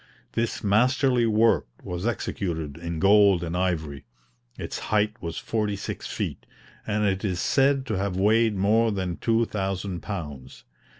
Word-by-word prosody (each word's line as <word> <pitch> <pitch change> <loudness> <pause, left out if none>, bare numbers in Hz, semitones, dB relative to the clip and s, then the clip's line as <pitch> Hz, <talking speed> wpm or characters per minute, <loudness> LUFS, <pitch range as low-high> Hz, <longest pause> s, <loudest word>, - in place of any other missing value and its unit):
This 115 0 -2
masterly 125 +3 +3
work 115 +1 +3 0.2
was 90 +4 -3
executed 80 -10 -3
in 85 0 -5
gold 100 -1 +5
and 85 0 -3
ivory; 80 -6 -2 0.5
its - - -5
height 105 0 +2
was 85 -2 -5
forty 105 -2 -1
six 100 - -6
feet, - - -4 0.4
and 105 +1 0
it 95 -1 0
is 90 -4 -1
said 135 +5 +2
to 110 -7 -2
have 95 -2 -2
weighed 110 +2 +3
more 110 +4 +3
than 95 -4 -3
2000 100 -5 -1
pounds. 75 -10 -7
100 Hz, 140 wpm, -25 LUFS, 90-110 Hz, 0.5 s, gold